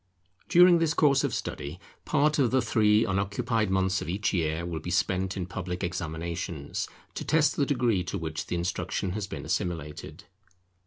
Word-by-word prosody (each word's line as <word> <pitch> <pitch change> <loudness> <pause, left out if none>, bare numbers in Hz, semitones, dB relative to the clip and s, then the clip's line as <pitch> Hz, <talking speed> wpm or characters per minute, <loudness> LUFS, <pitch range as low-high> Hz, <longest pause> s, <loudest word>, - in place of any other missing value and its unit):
During 175 0 +7
this 160 -2 +1
course 140 -2 +4
of 140 - 0
study, 80 -5 -5 0.3
part 150 0 +2
of 130 -4 +4
the 130 - +3
three 105 -2 +3
unoccupied 100 +3 0
months 95 0 +1
of - - -5
each 100 +4 -1
year 80 -1 0
will 85 -2 -3
be 85 - -6
spent 95 +2 0
in 90 - -2
public 90 0 -5
examinations, 85 -2 -4 0.3
to - - -5
test 155 -1 +3
the 140 - +1
degree 120 -9 +1
to 100 - -3
which 80 -2 -4
the - - -2
instruction 90 +1 -2
has 100 +1 -3
been - - -6
assimilated. 80 -4 -4
95 Hz, 170 wpm, -28 LUFS, 85-120 Hz, 0.3 s, During